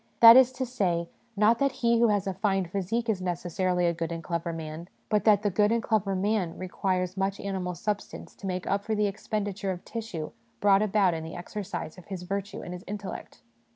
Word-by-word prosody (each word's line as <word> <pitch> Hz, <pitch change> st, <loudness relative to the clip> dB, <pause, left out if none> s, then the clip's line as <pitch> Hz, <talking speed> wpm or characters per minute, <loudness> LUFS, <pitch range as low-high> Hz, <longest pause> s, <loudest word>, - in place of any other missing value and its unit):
That 230 Hz, 0 st, +11 dB
is 260 Hz, -1 st, +7 dB
to 260 Hz, 0 st, -2 dB
say, 180 Hz, -9 st, -1 dB, 0.3 s
not 220 Hz, +3 st, +4 dB
that 275 Hz, -1 st, +2 dB
he 235 Hz, -2 st, +2 dB
who 235 Hz, -, +5 dB
has 205 Hz, -3 st, +1 dB
a 195 Hz, -, -1 dB
fine 195 Hz, 0 st, 0 dB
physique 200 Hz, +6 st, -2 dB
is 210 Hz, -5 st, 0 dB
necessarily 180 Hz, 0 st, 0 dB
a 170 Hz, -, +2 dB
good 165 Hz, 0 st, -3 dB
and 165 Hz, 0 st, -5 dB
clever 170 Hz, 0 st, -2 dB
man; 160 Hz, +1 st, -6 dB, 0.2 s
but 210 Hz, -1 st, +1 dB
that 210 Hz, -2 st, +5 dB
the 205 Hz, -, +1 dB
good 210 Hz, +3 st, +3 dB
and 230 Hz, 0 st, +1 dB
clever 210 Hz, -3 st, +1 dB
man 190 Hz, -3 st, 0 dB
requires 185 Hz, 0 st, -1 dB
much 195 Hz, +1 st, -1 dB
animal 185 Hz, -3 st, -3 dB
substance 205 Hz, +4 st, -4 dB
to 195 Hz, -, -6 dB
make 185 Hz, -1 st, -3 dB
up 200 Hz, 0 st, 0 dB
for 220 Hz, 0 st, -1 dB
the 210 Hz, 0 st, +2 dB
expenditure 205 Hz, -1 st, -3 dB
of 180 Hz, -2 st, -4 dB
tissue 215 Hz, -9 st, -5 dB, 0.3 s
brought 200 Hz, -1 st, +5 dB
about 205 Hz, -3 st, +3 dB
in 160 Hz, -1 st, -4 dB
the 160 Hz, +1 st, -7 dB
exercise 180 Hz, -2 st, -6 dB
of 175 Hz, -, -15 dB
his 190 Hz, -3 st, -6 dB
virtue 200 Hz, +2 st, -4 dB
and 175 Hz, -, -6 dB
his 180 Hz, 0 st, -8 dB
intellect. 200 Hz, 0 st, -7 dB
195 Hz, 215 wpm, -28 LUFS, 180-210 Hz, 0.3 s, That